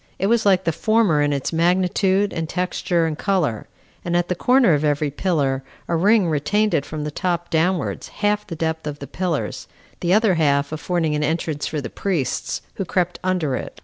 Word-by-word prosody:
It 195 - -1
was 225 0 +2
like 190 -1 +4
the 165 - +1
former 215 -4 +2
in 145 0 +2
its 140 +3 -2
magnitude, 185 +3 +2
and 165 -1 -3
texture, 180 -1 0
and 160 -1 -1
color; 160 - -1 0.4
and 175 0 0
at 175 0 0
the - - +2
corner 250 -1 +4
of 150 0 +1
every 145 -1 +1
pillar 140 -5 0 0.3
a 170 - 0
ring 200 +3 +4
retained 205 +8 +1
it 140 - 0
from 155 -1 -5
the 150 - -3
top 175 +1 -2
downwards 170 +3 0
half 210 0 -1
the 165 - -5
depth 160 -1 -2
of 145 -1 -4
the 140 - -8
pillars, 170 +3 -3 0.3
the 175 - -1
other 215 0 +4
half 145 -3 +1
affording 160 0 -1
an 150 0 0
entrance 155 -1 -1
for 150 -2 -3
the - - -7
priests, 165 -11 -2
who 195 - -1
crept 180 0 -1
under 180 -7 0
it. - - -7
170 Hz, 200 wpm, -21 LUFS, 150-190 Hz, 0.4 s, like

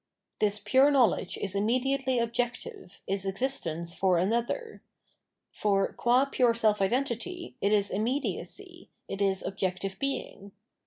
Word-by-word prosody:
This 210 -1 +1
pure 260 +7 +4
knowledge 245 -9 +2
is 195 -2 -4
immediately 255 +5 +1
objective, 235 -5 -3
is 195 0 -2
existence 190 -6 -3
for 185 -1 +2
another; 235 - -1 0.7
for, 195 -2 +1
qua 245 +3 +3
pure 250 -4 +2
self 215 -3 +2
identity, 260 - -2
it 200 - +2
is 205 -1 +2
immediacy, 290 - -3 0.2
it 195 - -5
is 195 -1 +1
objective 190 0 -3
being. 205 -7 -4
220 Hz, 120 wpm, -29 LUFS, 195-260 Hz, 0.7 s, pure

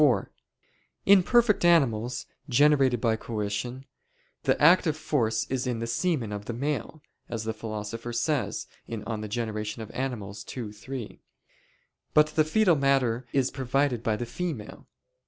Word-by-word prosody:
4: 125 -10 +3 0.7
In 200 -1 +7
perfect 230 0 +3
animals, 125 -8 +3 0.2
generated 135 -2 +4
by 115 -1 +2
coition, 110 +4 -4 0.6
the - - +2
active 160 0 +5
force 115 -8 0
is 130 0 -2
in 125 -2 -1
the 115 - -3
semen 120 - -1
of 105 0 -5
the 120 - -4
male, 145 +3 -3 0.3
as 115 -2 -3
the 110 0 -2
Philosopher 110 +1 -5
says 120 -2 -1 0.2
(De 115 - -3
Gener. 110 0 -4
Animal. 120 -7 -4 0.2
ii, 115 -4 -4
3); 115 +2 -8 0.9
but 150 0 +7
the 155 0 +3
foetal 175 +3 +3
matter 135 -4 +1
is 135 -2 +1
provided 135 -1 0
by 110 -2 0
the 120 - -4
female. 130 -3 -5
120 Hz, 135 wpm, -27 LUFS, 110-145 Hz, 0.9 s, In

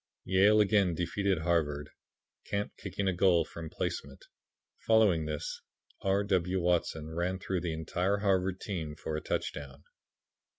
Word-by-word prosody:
Yale 100 +3 +5
again 100 -4 +3
defeated 95 +3 0
Harvard, 75 -4 0 0.5
Camp 100 0 -2
kicking 100 - -3
a 95 - +2
goal 85 -2 +4
from 80 -1 -8
placement. - - -4 0.5
Following 105 -8 +4
this 75 -1 -4 0.4
R. 95 +1 +2
W. 95 -2 +1
Watson 85 -3 0
ran 85 +3 -1
through 95 -1 -2
the 85 -2 -2
entire 90 +5 0
Harvard 95 -2 +1
team 80 -7 -4
for 75 +1 -4
a 75 - -2
touchdown. 70 0 -4
90 Hz, 135 wpm, -31 LUFS, 80-95 Hz, 0.5 s, Yale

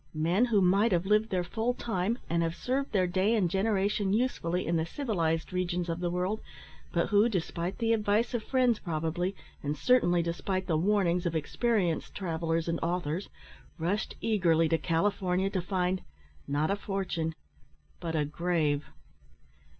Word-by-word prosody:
Men 170 +9 +2
who 220 -5 +3
might 195 +5 +4
have 175 +1 +1
lived 210 +2 +3
their 185 -2 0
full 225 +7 -1
time, 220 0 -1
and 170 0 +1
have 165 0 -1
served 270 +5 -2
their 190 -3 +3
day 190 +5 +2
and 200 -5 +2
generation 200 +1 +1
usefully 185 -7 0
in 170 - 0
the 160 - +2
civilised 170 - -1
regions 180 -1 -1
of 165 +1 -2
the 175 -1 -1
world, 180 +5 -1 0.5
but 170 - 0
who, 210 +3 +4
despite 180 -2 -2
the 230 -1 +2
advice 215 +2 +1
of 240 - 0
friends, 250 -1 +2
probably, 170 +3 -2 0.3
and 145 +1 -2
certainly 175 - +3
despite 185 +3 -2
the 170 -3 0
warnings 180 0 +2
of 165 - -2
experienced 180 +2 0
travellers 165 -3 -1
and 165 0 -1
authors, 175 +1 -2 0.5
rushed 185 +6 -1
eagerly 170 -7 +3
to 165 - +2
California 185 +2 +1
to 185 - -1
find, 185 0 -1 0.5
not 150 +5 +1
a - - +2
fortune, 190 -5 -3 0.6
but 165 -2 -3
a 150 -2 +1
grave. 155 -2 0
180 Hz, 160 wpm, -29 LUFS, 165-205 Hz, 0.6 s, might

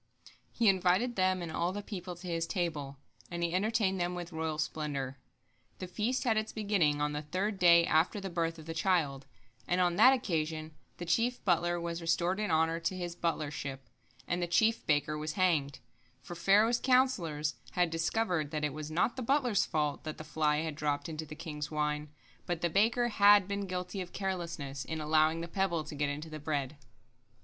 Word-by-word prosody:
He 235 - +1
invited 190 +5 +3
them 185 -1 +1
and 165 - -5
all 170 +2 0
the 205 +2 -5
people 185 -4 -6
to 175 +2 -12
his 165 -1 -1
table, 150 -7 -3 0.3
and 170 -1 -3
he 170 0 0
entertained 195 -1 +1
them 175 +1 -1
with 175 0 -6
royal 160 -1 -3
splendor. 140 -3 -3 0.6
The - - -5
feast 220 +8 -1
had 225 -3 +2
its 215 0 -1
beginning 200 -9 +1
on 150 0 0
the 150 - -2
third 190 +7 -2
day 170 -2 +7
after 160 +6 +2
the 195 - -5
birth 165 -1 -1
of 160 - -11
the 165 - -5
child, 165 -6 0 0.4
and 180 - +1
on 175 -1 +2
that 260 - +8
occasion 160 -8 -2 0.2
the 175 - -5
chief 230 +9 0
butler 175 -1 +2
was 170 0 -4
restored 170 +3 +1
in 210 - -1
honor 160 +1 +2
to 185 +2 -2
his 175 -1 -4
butlership, 145 -5 -3 0.5
and 175 0 -1
the 175 - 0
chief 220 +6 +2
baker 150 0 +1
was 155 0 -3
hanged, 160 -7 +1 0.5
for - - -8
Pharaoh's 210 +7 +3
counsellors 175 - +2 0.2
had 175 -2 +2
discovered 165 -1 0
that 150 0 -3
it 150 - -2
was 155 0 -6
not 175 +9 +1
the - - -3
butler's 250 -4 +2
fault 150 -3 -1
that 155 -1 -5
the - - -7
fly 150 -1 +1
had 160 -1 -3
dropped 145 +2 -2
into 160 0 -5
the 155 - -8
king's 150 -2 -5
wine, 150 -1 -2 0.4
but 175 -2 -2
the 170 - 0
baker 230 +6 +3
had 205 -2 +6
been 200 0 -3
guilty 180 +1 -4
of 180 - -8
carelessness 170 -8 -4
in 160 +5 -4
allowing 155 +1 +2
the 170 - -4
pebble 175 -2 0
to 150 - -9
get 145 0 -1
into 150 +3 -5
the 155 - -6
bread. 145 -1 -3
170 Hz, 195 wpm, -31 LUFS, 155-190 Hz, 0.6 s, that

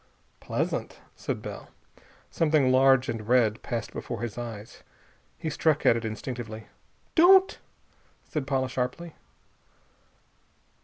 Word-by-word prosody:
"Pleasant," - - -3 0.2
said - - -4
Bell. - - -8 0.6
Something 150 -5 +2
large 130 0 +5
and 110 -2 -4
red 115 -3 +3
passed 115 -2 -4
before 120 -1 -5
his 115 -4 -4
eyes. 115 -3 -8 0.6
He 160 -2 -4
struck 155 0 +1
at - - +6
it 115 - -3
instinctively. 110 0 -6 0.5
"Don't!" 375 +3 +6 0.7
said 150 -6 -4
Paula 135 -1 0
sharply. 130 +6 -4
130 Hz, 110 wpm, -27 LUFS, 115-150 Hz, 0.7 s, at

